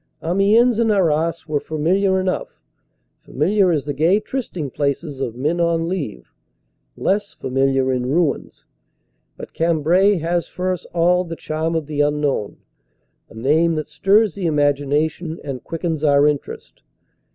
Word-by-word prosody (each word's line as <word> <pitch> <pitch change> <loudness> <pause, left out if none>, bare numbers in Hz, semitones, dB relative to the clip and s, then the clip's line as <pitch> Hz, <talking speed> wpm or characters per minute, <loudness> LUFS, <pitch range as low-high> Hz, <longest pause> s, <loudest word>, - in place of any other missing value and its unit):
Amiens 210 +7 +3
and 225 -2 +3
Arras 165 -3 +1
were 150 -1 0
familiar 190 +6 +1
enough; 185 0 -3 0.6
familiar 190 +7 +1
as 150 -4 -1
the 145 - -3
gay 165 +8 +3
trysting 215 - -5
places 140 0 -2
of 120 -4 -3
men 150 +7 -1
on 165 -1 +1
leave; 145 - -5 0.6
less 200 +1 -1
familiar 135 0 0
in 125 -1 -1
ruins. 160 0 -1 0.7
But - - -10
Cambrai 170 +5 +2
has 170 0 -1
for 185 +1 -2
us 180 - -7
all 175 +1 +2
the 165 -2 -6
charm 160 +1 -3
of 160 -2 -1
the 145 0 -1
unknown, 145 -7 -1 0.7
a - - -15
name 155 +8 +2
that 155 -1 -3
stirs 195 +6 +3
the 190 -4 -3
imagination 150 +3 0
and 135 -3 -6
quickens 165 -2 -3
our 145 -1 +4
interest. 140 - -4
160 Hz, 140 wpm, -20 LUFS, 145-180 Hz, 0.7 s, our